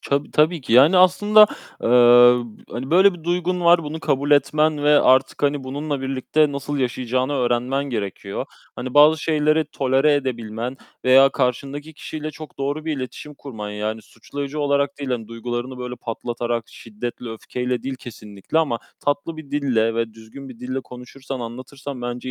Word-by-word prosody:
Tabii, 140 Hz, +1 st, -2 dB
tabii 160 Hz, +2 st, +2 dB
ki. 125 Hz, -, -5 dB
Yani, 145 Hz, +10 st, +6 dB
aslında, 205 Hz, +4 st, +6 dB, 0.4 s
eee, 120 Hz, 0 st, +6 dB, 0.3 s
hani, 130 Hz, +4 st, -6 dB
böyle 190 Hz, +2 st, +5 dB
bir 165 Hz, -, -13 dB
duygun 180 Hz, +1 st, -1 dB
var. 170 Hz, 0 st, +5 dB
Bunu 155 Hz, +1 st, -6 dB
kabul 145 Hz, -2 st, -1 dB
etmen 150 Hz, +1 st, +2 dB
ve 150 Hz, 0 st, +5 dB
artık, 130 Hz, +2 st, +3 dB
hani, 140 Hz, -1 st, 0 dB
bununla 145 Hz, +1 st, -4 dB
birlikte 135 Hz, +3 st, 0 dB
nasıl 140 Hz, +1 st, -4 dB
yaşayacağını 130 Hz, +1 st, -1 dB
öğrenmen 125 Hz, +1 st, 0 dB
gerekiyor. 100 Hz, -6 st, -4 dB, 0.3 s
Hani, 125 Hz, +1 st, -6 dB
bazı 150 Hz, +1 st, +6 dB
şeyleri 155 Hz, 0 st, +2 dB
tolere 135 Hz, 0 st, +1 dB
edebilmen 120 Hz, -2 st, -3 dB, 0.3 s
veya 135 Hz, +2 st, +7 dB
karşındaki 140 Hz, +4 st, -3 dB
kişiyle 155 Hz, 0 st, -6 dB
çok 155 Hz, -1 st, -12 dB
doğru 145 Hz, +3 st, -3 dB
bir 160 Hz, -2 st, -2 dB
iletişim 135 Hz, +3 st, -7 dB
kurman, 110 Hz, -8 st, -8 dB
yani, 105 Hz, +1 st, -4 dB
suçlayıcı 140 Hz, +7 st, -7 dB
olarak 140 Hz, -1 st, 0 dB
değil, 140 Hz, -2 st, -5 dB
hani, 115 Hz, -3 st, -3 dB
duygularını, 120 Hz, +2 st, -5 dB
böyle, 125 Hz, 0 st, -6 dB
patlatarak, 120 Hz, 0 st, -4 dB
şiddetle, 115 Hz, +2 st, -7 dB
öfkeyle 125 Hz, +2 st, -4 dB
değil 135 Hz, 0 st, -4 dB
kesinlikle 105 Hz, +2 st, -5 dB
ama 140 Hz, -8 st, 0 dB, 0.2 s
tatlı 145 Hz, +3 st, -2 dB
bir 150 Hz, -3 st, -11 dB
dille 120 Hz, -6 st, +1 dB
ve 115 Hz, -1 st, -2 dB
düzgün 115 Hz, +5 st, -12 dB
bir 125 Hz, -3 st, -12 dB
dille 130 Hz, +1 st, -3 dB
konuşursan, 125 Hz, +1 st, -9 dB
anlatırsan 130 Hz, +3 st, -8 dB
bence 120 Hz, +1 st, -5 dB
135 Hz, 160 wpm, -21 LUFS, 120-150 Hz, 0.4 s, veya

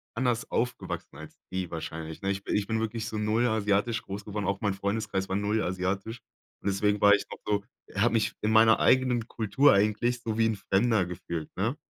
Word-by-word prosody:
anders 120 Hz, -1 st, 0 dB
aufgewachsen 125 Hz, +1 st, -3 dB
als -, -, -11 dB, 0.2 s
die 95 Hz, -2 st, -3 dB
wahrscheinlich, 80 Hz, -1 st, -6 dB
ne? 95 Hz, -, +1 dB
Ich 100 Hz, 0 st, -4 dB
bi -, -, -5 dB
ich 105 Hz, -1 st, +1 dB
bin 110 Hz, -1 st, 0 dB
wirklich 110 Hz, 0 st, -3 dB
so 110 Hz, -, -4 dB
0 110 Hz, +3 st, +2 dB
asiatisch 110 Hz, +1 st, +1 dB
groß 100 Hz, +1 st, -7 dB
geworden. 105 Hz, 0 st, -3 dB
Auch 100 Hz, 0 st, -1 dB
mein 100 Hz, -2 st, +1 dB
Freundeskreis 100 Hz, -1 st, -2 dB
war 95 Hz, -, -1 dB
0 105 Hz, +2 st, 0 dB
asiatisch. 95 Hz, +5 st, -2 dB, 0.4 s
Und -, -, -3 dB
deswegen 105 Hz, +1 st, +1 dB
war 100 Hz, 0 st, +7 dB
ich 100 Hz, -, +2 dB
noch -, -, -6 dB
so 105 Hz, -1 st, 0 dB, 0.3 s
habe 115 Hz, +4 st, +2 dB
mich 110 Hz, -2 st, +1 dB
in 105 Hz, +1 st, +1 dB
meiner 110 Hz, 0 st, +6 dB
eigenen 125 Hz, -3 st, +3 dB
Kultur 115 Hz, +6 st, +3 dB
eigentlich 110 Hz, +4 st, +1 dB
so 110 Hz, -1 st, -2 dB
wie 115 Hz, -, +4 dB
'n 110 Hz, -, 0 dB
Fremder 100 Hz, 0 st, +2 dB
gefühlt, 85 Hz, -3 st, -5 dB
ne? 115 Hz, +10 st, -1 dB
105 Hz, 205 wpm, -28 LUFS, 100-115 Hz, 0.4 s, war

